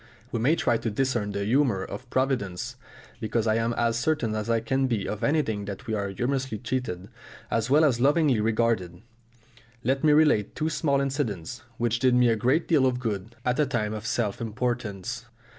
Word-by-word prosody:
We 115 - -1
may 135 +8 +3
try 120 - +1
to 115 - -3
discern 120 -2 0
the 100 0 -2
humour 120 -4 +2
of 115 +7 -8
Providence, 125 -3 -1 0.4
because 110 0 -1
I 110 - +3
am 115 +1 0
as 115 0 +1
certain 130 -6 0
as 110 +1 -3
I 115 0 +3
can 135 +4 0
be 115 -6 -1
of 105 - -4
anything 115 -9 +1
that 100 +5 -7
we 110 - -3
are 100 -2 -1
humorously 125 +2 -2
treated 115 -6 -3 0.4
as 115 +1 0
well 150 +3 +5
as 125 -6 +2
lovingly 145 -3 +3
regarded. 110 -5 0 0.8
Let 135 +4 0
me 155 - +5
relate 150 -9 +3
two 155 - -1
small 145 -2 +1
incidents 125 - -3 0.2
which 120 0 0
did 130 -1 +3
me 125 -1 +5
a 115 - +3
great 130 +9 +1
deal 145 -6 +4
of 125 -1 0
good 110 -2 -4
at 125 +2 +1
a 150 - +3
time 110 -5 -1
of 110 +1 -5
self 115 -4 -1
importance. 115 0 -3
120 Hz, 190 wpm, -26 LUFS, 110-130 Hz, 0.8 s, well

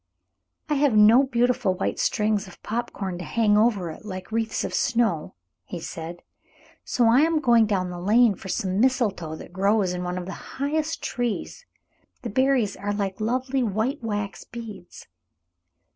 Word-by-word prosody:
"] - - -53
"I - - +2
have 280 -6 +3
no 215 +5 +7
beautiful 245 -5 +1
white 190 - -2
strings 210 -1 +1
of 180 - -15
pop 235 +2 -3
corn 190 -3 -5
to - - -5
hang 215 -1 +2
over 210 -6 +2
it 155 - -11
like 185 -2 -7
wreaths 225 0 -1
of - - -4
snow," 220 -10 0 0.3
he 175 - -7
said, 165 +1 -7 0.6
"so 245 - +1
I 235 +3 +5
am 325 +1 +3
going 235 -5 +4
down 185 -3 -1
the 175 0 -7
lane 220 +4 +4
for 195 - -11
some 190 +1 -1
mistletoe 215 - +1
that 170 - -11
grows 195 0 +2
in 180 0 -3
one 180 0 -3
of 180 - -4
the 190 - -9
highest 310 +3 -1
trees. 245 - -3 0.6
The 235 - -4
berries 260 -3 +2
are 205 0 -3
like 200 0 -3
lovely 255 +4 0
white 230 +5 -1
wax 205 -2 -3
beads." 215 -6 -10
215 Hz, 175 wpm, -25 LUFS, 190-240 Hz, 0.6 s, no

